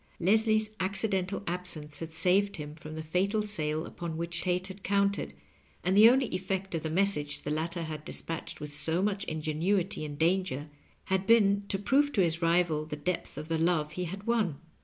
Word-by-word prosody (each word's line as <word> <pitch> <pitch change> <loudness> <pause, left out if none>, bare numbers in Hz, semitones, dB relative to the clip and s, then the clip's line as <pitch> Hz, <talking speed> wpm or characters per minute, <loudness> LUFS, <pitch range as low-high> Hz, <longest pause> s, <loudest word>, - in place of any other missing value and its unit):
Leslie's 215 +3 +3
accidental 195 0 -1
absence 170 -4 -5
had 165 -1 -6
saved 185 +5 +2
him 150 -1 -6
from 155 0 -9
the 160 - -5
fatal 195 +7 +1
sale 155 -6 -1
upon 170 -2 -5
which 170 0 -2
Tate 180 0 0
had 195 +1 -9
counted, 200 - 0 0.5
and 185 +2 +2
the 215 +3 +9
only 260 +2 +4
effect 190 +1 -2
of 165 - -1
the 160 - -3
message 160 -4 +1
the 150 - -3
latter 165 +3 -2
had 155 -2 -6
dispatched 165 +1 -5
with 150 0 -6
so 160 +4 +1
much 200 -1 0
ingenuity 160 +4 -1
and 145 -1 -5
danger 160 -3 0 0.4
bad 190 +1 +1
been 200 -3 +5
to 195 - -1
prove 275 +9 +2
to 200 - +3
his 170 -1 +1
rival 165 -2 +2
the 155 -1 -5
depth 150 0 -3
of 150 +1 -5
the 165 0 0
love 160 -3 +1
he 180 +3 -3
had 195 +4 -6
won. 220 -11 +1
180 Hz, 190 wpm, -30 LUFS, 155-200 Hz, 0.5 s, the